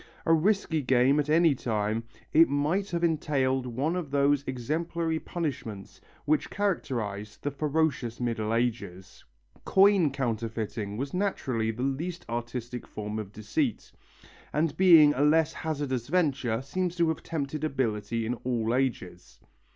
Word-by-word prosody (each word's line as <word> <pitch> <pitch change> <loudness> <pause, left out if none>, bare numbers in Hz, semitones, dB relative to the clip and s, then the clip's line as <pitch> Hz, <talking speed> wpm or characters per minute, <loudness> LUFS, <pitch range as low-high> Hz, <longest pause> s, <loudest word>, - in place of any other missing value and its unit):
A 165 - +4
risky 165 -1 +2
game 130 +2 +3
at 150 0 -1
any 165 0 +5
time, 110 -2 -2 0.3
it 165 +2 +6
might 155 +8 0
have 170 -1 -2
entailed 135 -5 +1
one 135 +8 -1
of 175 -5 -3
those 140 0 +2
exemplary 160 +5 -2
punishments 130 - -5 0.2
which 155 +1 +1
characterized 110 - -3
the 145 - -1
ferocious 145 -5 -1
Middle 115 -3 -1
Ages. 115 -6 -3 0.4
Coin 195 -4 +5
counterfeiting 115 -5 -3
was 135 +3 -4
naturally 135 - -1
the 115 +3 -3
least 165 +6 -3
artistic 120 +1 -5
form 105 0 -5
of 105 -2 -6
deceit, 110 +4 -2 0.6
and 150 0 0
being 165 -6 +7
a 135 - -1
less 155 +2 +3
hazardous 140 -6 -3
venture 140 -8 0
seems 180 +5 -2
to 170 -2 +2
have 160 - -2
tempted 155 -2 -4
ability 115 -6 -1
in 120 - -1
all 120 -2 0
ages. 110 -9 -3
135 Hz, 135 wpm, -28 LUFS, 115-160 Hz, 0.6 s, being